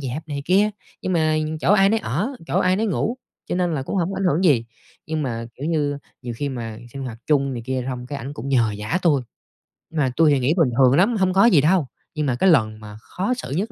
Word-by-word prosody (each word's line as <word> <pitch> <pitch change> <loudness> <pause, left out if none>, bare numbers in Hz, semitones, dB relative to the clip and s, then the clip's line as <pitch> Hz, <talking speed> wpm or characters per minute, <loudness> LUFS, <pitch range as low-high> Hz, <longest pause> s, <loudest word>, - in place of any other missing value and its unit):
dẹp 140 +4 -5
này 140 -1 -4
kia, 200 +5 +3 0.3
nhưng 185 - -1
mà 155 -2 +2 0.2
chỗ 185 - +3
ai 195 -1 +5
nấy 225 +2 +2
ở, 185 - -1 0.2
chỗ - - 0
ai 185 0 +2
nấy 220 +2 0
ngủ 220 +4 -1 0.3
cho - - -1
nên 175 -2 0
là 135 - -2
cũng 165 - -4
hổng 180 +1 0
có - - -5
ảnh 195 - -1
hưởng 180 +1 +2
gì. 135 -9 +4 0.4
Nhưng 155 -1 -2
mà, 115 -4 -3
kiểu 140 - -5
như, 145 -3 0 0.2
nhiều 120 -2 -5
khi 145 - -2
mà 115 -4 -5
sinh 135 - -6
hoạt 115 -3 -6
chung 140 -3 +2
này 120 -2 -5
kia 130 -1 -1
xong 125 -1 -5
cái 140 +1 -5
ảnh 135 +3 -6
cũng 125 +5 -6
nhờ 115 -6 +2
vả 105 - -2
tui. 145 -6 +3 0.7
Mà 150 -5 +1
tui 160 -2 +5
thì 140 - +3
nghĩ 135 +5 +2
bình 160 -7 +4
thường 130 -1 +6
lắm, 205 +8 +3
hông 185 -2 +2
có 195 +3 +5
gì 180 -12 +6
đâu. 160 -2 +2 0.3
Nhưng 150 - -1
mà 130 -3 +1
cái 185 +10 +3
lần 110 -8 +3
mà 105 -1 -10
khó 195 - -2
xử 245 - -6
nhất 195 +11 -2
150 Hz, 265 wpm, -22 LUFS, 130-180 Hz, 0.7 s, thường